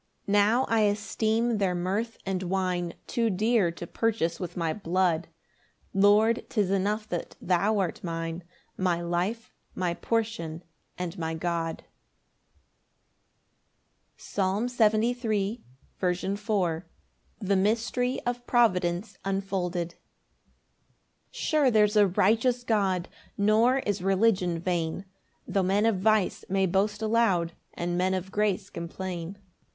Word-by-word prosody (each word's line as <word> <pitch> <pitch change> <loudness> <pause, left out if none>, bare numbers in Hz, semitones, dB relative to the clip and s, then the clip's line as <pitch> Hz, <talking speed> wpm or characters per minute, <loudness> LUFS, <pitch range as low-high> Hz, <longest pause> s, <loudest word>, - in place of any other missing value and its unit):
5 - - -9
Now 205 +5 +4
I 225 - +2
esteem 220 +2 +1
their 185 -3 +1
mirth 200 +6 -2
and 190 -1 -1
wine 180 -2 -1
Too 235 -3 0
dear 215 -1 +2
to 170 - -7
purchase 190 -4 -1
with 180 -1 -6
my 165 -2 0
blood; 175 -3 0 0.7
Lord, 210 +4 +4
'tis 205 -5 +1
enough 205 +2 0
that 175 - -4
thou 195 +4 +1
art 185 -4 -2
mine, 165 0 -4 0.3
My 180 -2 0
life, 175 +7 -2 0.2
my 180 -2 0
portion, 180 -7 -2 0.3
and 180 0 -5
my 160 0 -2
God. 165 0 -2 2.3
Psalm 195 +3 -1
73:4. 225 -1 +1 0.4
S. 180 -1 0
M. 195 -1 -4
The 200 - +3
mystery 230 +5 +1
of 245 0 -3
providence 190 -4 +1
unfolded. 190 -3 -2
1 - - -21 1.3
Sure 300 -4 +2
there's 210 -2 +3
a 205 -1 +6
righteous 230 +7 +2
God, 195 -6 +1 0.3
Nor 220 +5 +4
is 205 -3 -1
religion 190 -2 +2
vain, 170 +1 -2 0.4
Tho' 195 - +1
men 195 +3 +2
of 225 -5 +2
vice 215 -1 +2
may 195 0 +2
boast 205 +4 0
aloud, 215 -7 +2 0.2
And 175 +1 -2
men 185 +1 +2
of 190 +1 -4
grace 205 -2 0
complain. 175 +1 -5
195 Hz, 120 wpm, -27 LUFS, 180-220 Hz, 2.3 s, a